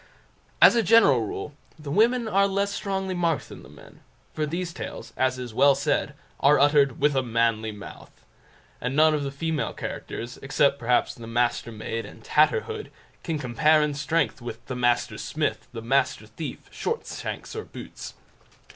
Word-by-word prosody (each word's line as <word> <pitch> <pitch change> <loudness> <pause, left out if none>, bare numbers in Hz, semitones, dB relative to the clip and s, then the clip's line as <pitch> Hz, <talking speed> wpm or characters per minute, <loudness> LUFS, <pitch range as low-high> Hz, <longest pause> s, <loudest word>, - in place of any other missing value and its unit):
As - - +9
a 235 - +3
general 200 - +5
rule, 125 +9 -6 0.2
the 150 -2 -7
women 230 - +3
are 200 -2 +3
less 200 +1 -1
strongly 195 -2 -2
marked 170 -3 -1
than - - -10
the - - -14
men; - - -16 0.3
for 155 -1 -1
these 170 +2 -3
tales, - - -7
as 130 0 +1
is 125 -3 -6
well 140 +4 +5
said, 145 0 -1 0.2
are 145 +2 +5
uttered 140 -2 +4
"with 145 0 +2
a 135 - +3
manly 115 -2 0
mouth"; 105 -2 -12 0.6
and 125 +2 -2
none 155 +1 +5
of 150 - 0
the 140 - -2
female 155 +2 -2
characters, 120 +2 -6
except 140 0 +2
perhaps 120 0 +1
"The 115 -1 -10
Mastermaid", 115 -1 -2
and - - -14
"Tatterhood", 445 -2 +1 0.3
can 165 -3 -2
compare 150 +4 +3
in 150 -1 -1
strength 150 -4 -1
with 120 -1 -8
"The 130 - -5
Master 120 -1 +1
Smith", - - -2
"The 115 -2 -7
Master 135 +4 +1
Thief," - - -8
"Shortshanks" 460 -1 -5
or 440 - -4
"Boots". - - -10
145 Hz, 165 wpm, -25 LUFS, 120-170 Hz, 0.6 s, As